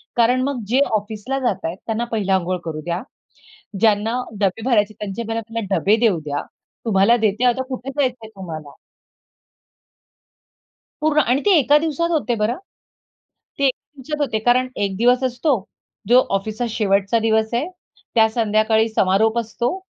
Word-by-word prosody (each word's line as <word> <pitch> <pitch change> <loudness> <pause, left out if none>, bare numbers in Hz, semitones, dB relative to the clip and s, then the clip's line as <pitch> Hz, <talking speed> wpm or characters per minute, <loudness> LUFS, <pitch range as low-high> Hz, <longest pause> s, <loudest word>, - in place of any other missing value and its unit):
कारण 245 +2 +3
मग 275 -4 -2
जे 255 +4 +2 0.2
ऑफिसला 215 +5 -4
जातायत 190 -9 -2
त्यांना 230 +1 -1
पहिले 205 -4 -1
अंघोळ 185 -1 +1
करू 155 -2 -4
द्या. 170 +2 -3 0.8
ज्यांना 225 +3 +2 0.2
डबे 200 +2 0
भरायचे 215 -4 +2
त्यांचे 210 +2 -4
मला 225 0 -2
पहिले 225 +1 -5
डबे 205 +2 +3
देऊ 215 -8 +3
द्या. 145 -1 -3 0.4
"तुम्हाला 215 +3 +4
देते 220 +2 +1
आता 250 +1 +2
कुठे 260 0 -5
जायचंय 250 -4 -1
तुम्हाला?" 155 -6 -8 2.3
पूर्ण 305 0 +2
आणि 250 +3 +2
ते - - +5
एका 290 +1 +4
दिवसात 325 +2 -1
होते 290 -7 0
बरं. 225 +5 +1 1.0
ते 280 - +1
एक 265 - +3 0.2
दिवसात 300 +3 -5
होते 240 -7 0
कारण 245 +3 +2 0.2
एक 195 -1 -3
दिवस 245 +4 +3
असतो 260 +3 +1 0.5
जो 245 +2 +7 0.2
ऑफिसचा 215 +4 -4
शेवटचा 200 0 +1
दिवस 220 0 +2
आहे, 280 +9 0 0.5
त्या 220 -1 +5
संध्याकाळी 220 0 +2
समारोप 220 +2 +2
असतो 235 - -2
225 Hz, 150 wpm, -20 LUFS, 205-250 Hz, 2.3 s, जो